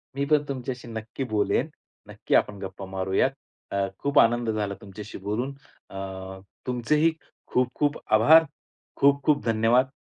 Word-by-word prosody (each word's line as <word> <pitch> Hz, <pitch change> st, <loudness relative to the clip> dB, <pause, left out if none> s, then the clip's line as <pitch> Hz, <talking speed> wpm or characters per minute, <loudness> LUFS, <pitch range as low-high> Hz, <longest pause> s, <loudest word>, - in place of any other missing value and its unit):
मी 140 Hz, 0 st, 0 dB
पण 150 Hz, 0 st, +3 dB
तुमच्याशी 130 Hz, -2 st, -5 dB
नक्की 115 Hz, +3 st, -5 dB
बोलेन, 105 Hz, -1 st, +1 dB, 0.4 s
नक्की -, -, -1 dB
आपण 105 Hz, -, +2 dB
गप्पा 95 Hz, 0 st, -7 dB
मारूयात. 95 Hz, 0 st, 0 dB, 0.4 s
अ, 100 Hz, 0 st, 0 dB
खूप 140 Hz, +1 st, +2 dB
आनंद 120 Hz, 0 st, +3 dB
झाला 105 Hz, -2 st, -1 dB
तुमच्याशी 100 Hz, +1 st, -9 dB
बोलून 120 Hz, +7 st, -2 dB, 0.4 s
अ, 95 Hz, 0 st, -7 dB, 0.3 s
तुमचे 125 Hz, +3 st, 0 dB
ही 165 Hz, +2 st, +4 dB, 0.4 s
खूप-खूप 130 Hz, +4 st, 0 dB, 0.2 s
आभार, 150 Hz, +10 st, +7 dB, 0.5 s
खूप-खूप 140 Hz, +1 st, +3 dB
धन्यवाद. 115 Hz, +3 st, +3 dB
115 Hz, 130 wpm, -26 LUFS, 100-140 Hz, 0.5 s, आभार